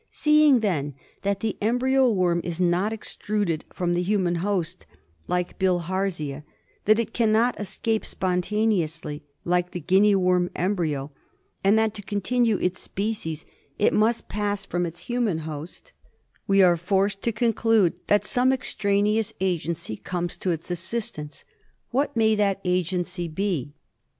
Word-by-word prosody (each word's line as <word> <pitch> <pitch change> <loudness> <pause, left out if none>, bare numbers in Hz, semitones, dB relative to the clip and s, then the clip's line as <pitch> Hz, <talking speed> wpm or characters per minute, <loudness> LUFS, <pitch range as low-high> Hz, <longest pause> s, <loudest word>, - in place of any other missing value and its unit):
Seeing 300 -4 +4
then 145 -9 -1 0.3
that 200 0 -1
the 220 -2 -2
embryo 255 +4 +3
worm 180 -5 +2
is 175 0 -4
not 180 +4 +2
extruded 205 -6 -2
from 175 -1 -1
the 175 - +1
human 180 -2 +1
host 190 -4 -2 0.4
like 180 0 -2
Bilharzia, 180 -5 -1 0.4
that 215 +1 +5
it 230 -1 -2
cannot 230 +1 +2
escape 210 +2 -1
spontaneously 180 -5 -1 0.2
like 180 0 +1
the 180 - -5
Guinea 195 +5 +4
worm 180 -1 +2
embryo, 160 -7 -1 0.5
and 200 +3 +5
that 220 -1 +2
to 210 - -6
continue 215 +3 +1
its 180 0 -1
species 195 -7 -4 0.3
it 210 - +3
must 225 +2 +2
pass 205 -1 -2
from 175 -2 -1
its 170 +1 -9
human 240 -5 0
host, 160 - -8 0.6
we 195 -1 +5
are 175 -2 +5
forced 195 +3 0
to 235 - 0
conclude 225 -4 +2
that 205 - +3
some 250 +1 +2
extraneous 210 -4 +1
agency 170 - -2
comes 175 -1 -3
to 185 - -2
its 165 +1 -3
assistance. 175 -3 -4 0.5
What 275 0 0
may 220 -1 +4
that 200 -2 +1
agency 180 0 -1
be 155 -5 -2
195 Hz, 140 wpm, -25 LUFS, 175-215 Hz, 0.6 s, that